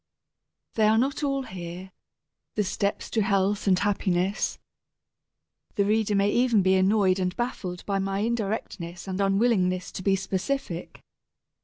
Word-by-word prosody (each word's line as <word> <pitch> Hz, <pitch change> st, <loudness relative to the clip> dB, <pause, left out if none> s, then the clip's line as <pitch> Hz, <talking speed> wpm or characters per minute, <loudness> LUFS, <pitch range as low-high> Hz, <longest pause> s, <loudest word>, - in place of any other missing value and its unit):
They 215 Hz, -1 st, +3 dB
are 220 Hz, +1 st, +4 dB
not 270 Hz, +5 st, 0 dB
all 275 Hz, -1 st, 0 dB
here, 180 Hz, -2 st, -8 dB, 0.6 s
the 210 Hz, -, +2 dB
steps 200 Hz, +1 st, -2 dB
to 225 Hz, -, +1 dB
health 200 Hz, +1 st, +1 dB
and 185 Hz, -2 st, +5 dB
happiness. 195 Hz, -1 st, 0 dB, 1.2 s
The 200 Hz, -4 st, +2 dB
reader 215 Hz, 0 st, +1 dB
may 200 Hz, +1 st, +3 dB
even 235 Hz, -5 st, +3 dB
be 190 Hz, 0 st, +4 dB
annoyed 190 Hz, 0 st, +3 dB
and 180 Hz, -1 st, -1 dB
baffled 190 Hz, -7 st, -4 dB
by 200 Hz, -1 st, 0 dB
my 195 Hz, +1 st, -1 dB
indirectness 200 Hz, -6 st, -3 dB
and 190 Hz, +1 st, -2 dB
unwillingness 195 Hz, -3 st, +2 dB
to -, -, -6 dB
be 195 Hz, +1 st, +2 dB
specific. 190 Hz, 0 st, -3 dB
195 Hz, 140 wpm, -26 LUFS, 185-215 Hz, 1.2 s, and